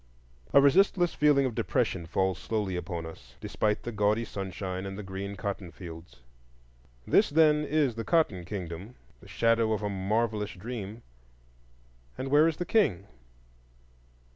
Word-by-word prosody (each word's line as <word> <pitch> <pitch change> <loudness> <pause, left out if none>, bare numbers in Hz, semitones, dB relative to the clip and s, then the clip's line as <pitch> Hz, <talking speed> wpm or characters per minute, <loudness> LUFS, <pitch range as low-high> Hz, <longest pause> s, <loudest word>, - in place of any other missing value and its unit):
A - - +7
resistless 175 +4 +4
feeling 145 -2 +4
of 125 - -1
depression 85 -5 -1
falls 95 +1 0
slowly 105 -4 -2
upon 85 -1 -4
us, 80 - -12
despite 105 -1 -1
the 120 - -4
gaudy 105 +2 +1
sunshine 95 -1 -5
and 95 0 -6
the 105 - -6
green 95 +1 -5
cottonfields. 90 -6 -7 0.8
This, 210 - +4
then, 150 0 +4
is 150 -4 +1
the 115 +1 -5
Cotton 135 - +1
Kingdom,—the 90 - -8
shadow 115 -1 +2
of 105 - -3
a 105 - -1
marvellous 105 +2 -1
dream. 110 +1 -7 1.1
And 135 - -4
where 150 +3 +5
is 165 - -1
the 175 - -3
King? 135 - +2
105 Hz, 140 wpm, -29 LUFS, 95-135 Hz, 1.1 s, A